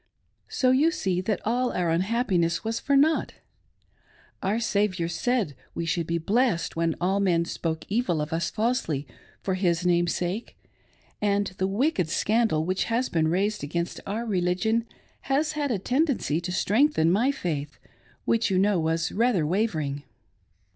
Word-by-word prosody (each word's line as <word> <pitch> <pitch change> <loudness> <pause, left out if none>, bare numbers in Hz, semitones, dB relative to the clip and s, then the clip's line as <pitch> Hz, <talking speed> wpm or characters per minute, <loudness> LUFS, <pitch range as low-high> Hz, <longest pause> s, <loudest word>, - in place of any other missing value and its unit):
So 255 -1 +2
you 285 +5 +4
see 190 - -1
that 195 0 -1
all 245 +3 +1
our 175 -2 0
unhappiness 180 -2 +1
was 225 +1 -2
for 280 +2 +2
nought. 310 +3 +2 1.1
Our 205 +4 0
Saviour 200 -6 0
said 210 - -1 0.2
we 170 - -2
should 165 0 -1
be 170 - 0
blessed 200 0 +1
when 165 -1 0
all 190 +3 +1
men 175 -4 +2
spoke 160 -1 -3
evil 205 -6 0
of 150 +2 -3
us 165 0 0
falsely 210 - -1 0.4
for 190 - 0
His 180 -2 0
name's 175 -1 +2
sake; 180 +6 -4 0.6
and 205 -1 +2
the 190 - +1
wicked 200 - 0
scandal 210 -4 +1
which 185 +2 0
has 240 +2 0
been 160 -2 +1
raised 200 +4 0
against 170 +4 -3
our 220 +4 -2
religion 215 +4 0 0.4
has 295 +3 +2
had 295 -2 -2
a 230 - +1
tendency 250 - 0
to 180 +1 -4
strengthen 205 - +3
my 235 +9 +3
faith, 150 - -4 0.5
which 230 0 +2
you 190 - +1
know 195 -1 +3
was 165 +1 0
rather 225 -7 +2
wavering. 155 -6 -1
190 Hz, 155 wpm, -26 LUFS, 170-230 Hz, 1.1 s, you